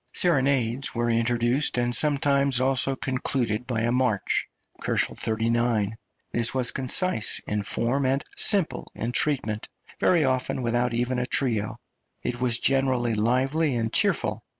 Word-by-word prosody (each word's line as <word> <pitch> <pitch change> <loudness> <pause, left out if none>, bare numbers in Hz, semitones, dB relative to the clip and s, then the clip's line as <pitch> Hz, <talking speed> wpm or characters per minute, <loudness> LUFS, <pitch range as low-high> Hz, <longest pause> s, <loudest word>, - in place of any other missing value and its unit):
Serenades 135 -7 +2
were 120 0 0
introduced 120 +4 +1
and 120 0 0
sometimes 140 -3 +2
also 135 +1 0
concluded 125 -3 -2
by 115 -3 -2
a 120 +1 0
march 125 -5 0 0.4
(39, 115 0 -1
K.). 110 - -10 0.4
This 120 +2 +2
was 125 -2 +3
concise 130 - +3
in 105 0 -2
form 125 +6 0
and 135 +2 0
simple 195 -5 +2
in 115 - -4
treatment, 120 -6 -1 0.3
very 170 -5 +2
often 130 0 -2
without 120 0 -1
even 125 +1 -1
a 125 - -3
trio; 115 -5 -1 0.5
it 120 0 -4
was 120 -2 +3
generally 130 -3 +1
lively 130 +7 0
and 115 -1 -3
cheerful. - - +1
125 Hz, 135 wpm, -24 LUFS, 115-135 Hz, 0.5 s, was